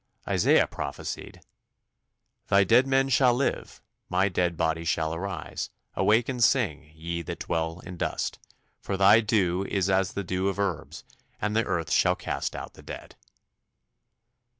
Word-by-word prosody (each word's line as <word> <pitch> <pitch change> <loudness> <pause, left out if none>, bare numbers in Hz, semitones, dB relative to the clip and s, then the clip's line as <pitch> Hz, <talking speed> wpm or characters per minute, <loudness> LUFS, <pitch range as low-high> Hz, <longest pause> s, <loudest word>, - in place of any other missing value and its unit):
Isaiah - - +4
prophesied, - - -6 1.1
"Thy 100 0 +5
dead 120 +7 +4
men 135 0 +3
shall 125 -1 +4
live, 135 +2 -2 0.3
my 95 +2 +2
dead 90 -2 0
body 80 0 0
shall 80 -1 0
arise. 95 +3 -5 0.2
Awake 110 +3 +3
and 125 -3 0
sing, 80 - +2
ye 85 +1 -4
that 85 - -6
dwell 80 +1 -2
in 90 -2 -9
dust: - - -2 0.4
for 95 - -3
thy 100 +3 +7
dew 95 -4 +1
is 95 -1 0
as 95 0 +1
the 100 - -3
dew 95 +1 -1
of 100 - -1
herbs, 100 -5 -3 0.4
and 105 +1 -1
the 115 - +2
earth 85 -5 -2
shall - - +4
cast - - -3
out - - -7
the - - -15
dead." - - -9
95 Hz, 150 wpm, -27 LUFS, 85-105 Hz, 1.1 s, thy